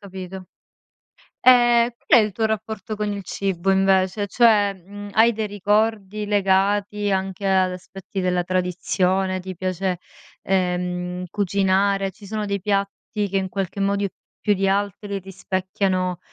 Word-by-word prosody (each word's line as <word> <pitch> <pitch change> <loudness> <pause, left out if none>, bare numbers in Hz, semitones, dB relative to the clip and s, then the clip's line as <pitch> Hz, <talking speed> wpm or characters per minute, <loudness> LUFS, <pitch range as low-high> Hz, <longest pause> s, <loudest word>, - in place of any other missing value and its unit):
Capito. 190 -2 -8 1.0
Ehm, 240 -1 +6 0.2
qual 240 - +7
è - - +4
il 210 - -2
tuo 220 +2 0
rapporto 220 -1 -3
con 210 0 -2
il 200 -1 -5
cibo 195 -1 -1
invece? 190 +1 +2
Cioè, 210 -3 +4
mhmm, 205 +3 -10
hai 230 +2 +5
dei 220 -1 -3
ricordi 210 0 0
legati 205 +1 +1
anche 190 +1 -2
ad 190 -1 +3
aspetti 190 +1 -7
della 180 -1 +1
tradizione? 185 +1 0
Ti 185 0 -7
piace, 185 0 -2 0.4
ehm, 180 -1 -1
cucinare? 195 0 +1
Ci 210 +1 -15
sono 215 +1 -3
dei 200 -1 -2
piatti 200 +1 -2
che 195 - 0
in 190 - -1
qualche 195 0 -4
modo 200 0 +1 0.3
più 210 - +3
di 195 0 0
altri 200 0 -1
rispecchiano, 185 -1 -2
195 Hz, 140 wpm, -22 LUFS, 185-205 Hz, 1.0 s, qual